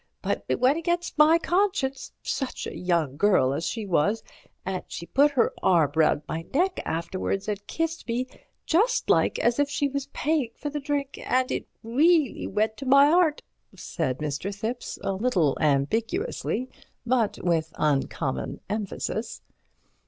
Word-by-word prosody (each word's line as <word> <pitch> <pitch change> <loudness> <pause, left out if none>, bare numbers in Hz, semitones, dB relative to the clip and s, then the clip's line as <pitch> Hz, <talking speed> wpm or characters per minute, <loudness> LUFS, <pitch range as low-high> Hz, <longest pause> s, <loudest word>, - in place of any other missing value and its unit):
But - - -1
it - - +1
went 265 +6 +3
against 345 +1 -1
my 310 +2 +7
conscience—such 310 -7 -2
a - - -6
young 170 -6 0
girl 145 -9 +3
as 160 +4 -2
she 225 -3 -3
was—and 190 0 -2
she 170 - -7
put 285 +10 +4
her 255 - +2
arm 165 -6 +3
round 155 -2 +3
my 165 +1 -4
neck 370 +5 +2
afterwards 185 +4 -2
and 205 -1 -4
kissed 330 -2 -3
me 240 +2 -1 0.4
just 435 +9 +2
like - - +3
as 240 +3 +1
if 285 -1 +2
she 285 0 0
was 280 0 -4
paying 295 -5 0
for 290 - -5
the 295 - -3
drink—and 275 -2 -1
it - - -3 0.2
reelly 290 +4 +2
went 215 +2 0
to 275 - -6
my 280 +2 +6
'eart," 330 -3 +3 0.3
said 135 -7 -3
Mr. 150 +6 -3
Thipps, 220 +5 -4
a 195 - 0
little 190 - +1
ambiguously, 225 - 0 0.4
but 235 -3 +1
with 165 -2 +1
uncommon 140 -1 -1
emphasis. 215 +2 -4
230 Hz, 145 wpm, -26 LUFS, 170-290 Hz, 0.4 s, my